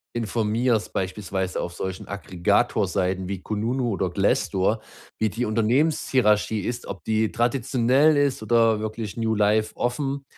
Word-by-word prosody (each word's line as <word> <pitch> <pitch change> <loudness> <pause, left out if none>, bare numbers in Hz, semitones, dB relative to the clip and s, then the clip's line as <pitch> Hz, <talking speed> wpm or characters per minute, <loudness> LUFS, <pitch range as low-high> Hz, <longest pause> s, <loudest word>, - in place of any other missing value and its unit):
informierst, 115 0 0
beispielsweise 95 0 -2
auf 85 - -5
solchen 95 +1 -5
Aggregator-Seiten 95 0 0
wie 95 -2 -4
Kununu 115 +4 -1
oder 95 -2 -1
Glassdoor, 95 +3 +1 0.4
wie 110 - +2
die 115 +5 -2
Unternehmenshierarchie 115 -2 +2
ist, 120 +5 -4
ob 95 -5 -7
die 110 0 +1
traditionell 130 +4 +2
ist 140 -4 +1
oder 115 -1 +3
wirklich 110 -1 -5
New 115 -1 0
Life 110 +1 +2
offen. 135 +3 -2
110 Hz, 125 wpm, -24 LUFS, 100-120 Hz, 0.4 s, oder